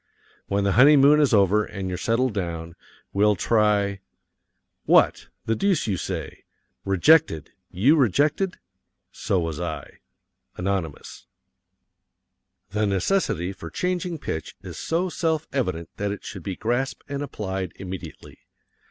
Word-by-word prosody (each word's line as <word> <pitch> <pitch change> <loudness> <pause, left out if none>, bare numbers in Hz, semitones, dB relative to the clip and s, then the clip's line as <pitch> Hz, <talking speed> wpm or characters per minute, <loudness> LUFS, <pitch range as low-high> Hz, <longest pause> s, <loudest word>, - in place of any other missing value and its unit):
When 100 0 0
the 100 - +2
honeymoon 140 +4 +6
is 145 -3 +3
over 105 0 +4
and 95 -2 -6
you're 90 - -3
settled 115 +6 0
down, 85 -4 -4 0.4
we'll 105 +1 +3
try 105 -1 +2 0.9
What? - - +4 0.2
the 115 - +1
deuce 195 - +1
you 105 -4 0
say! - - -5 0.4
Rejected 95 - +3 0.2
you 125 - +3
rejected? 150 - +2 0.5
So 95 - -1
was 80 -3 -3
I. 85 -3 -6 0.6
Anonymous. 90 -5 -4 1.4
The 105 +1 0
necessity 95 - 0
for 85 -3 -9
changing 180 - -2
pitch 80 - -5
is - - -8
so 170 +3 -1
self 160 -3 -1
evident 90 - -1
that 100 0 -1
it 100 - -6
should 100 -5 -7
be 95 +2 -4
grasped 120 +6 -2
and 140 0 -4
applied 95 -9 -4
immediately. 95 -3 -9
105 Hz, 125 wpm, -24 LUFS, 95-140 Hz, 1.4 s, honeymoon